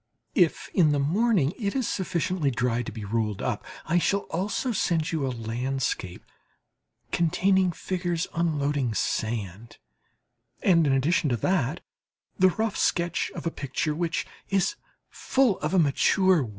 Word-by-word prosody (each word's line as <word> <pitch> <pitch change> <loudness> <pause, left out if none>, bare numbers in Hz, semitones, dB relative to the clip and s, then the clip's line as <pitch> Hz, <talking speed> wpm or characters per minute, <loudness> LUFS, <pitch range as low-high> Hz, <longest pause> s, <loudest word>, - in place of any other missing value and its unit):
If 175 -5 +2
in 155 -5 +4
the 145 - +1
morning 175 - +2
it 200 -1 -2
is 260 -4 0
sufficiently 180 -4 -1
dry 125 -1 0
to 120 - -6
be 110 -3 -7
rolled 105 -1 -1
up, - - -2 0.2
I 170 +2 +2
shall 200 +3 +1
also 200 +9 -1
send 170 -7 0
you 155 -5 -1
a - - 0
landscape 120 -4 -3 0.9
containing 185 +2 +2
figures 175 0 -2
unloading 145 -7 0
sand, 110 -1 -3 0.9
and 165 -5 +4
in 135 - +3
addition 145 +3 +2
to 120 - +1
that 160 - 0 0.6
the 185 0 +6
rough 220 +3 -2
sketch 170 -1 0
of - - -6
a 165 - 0
picture 145 +2 -2
which 165 +1 -1 0.2
is 195 - +1 0.3
full 260 -7 +1
of - - -2
a 190 - +2
mature 180 +3 +4
will. 115 - -6
165 Hz, 150 wpm, -26 LUFS, 130-185 Hz, 0.9 s, the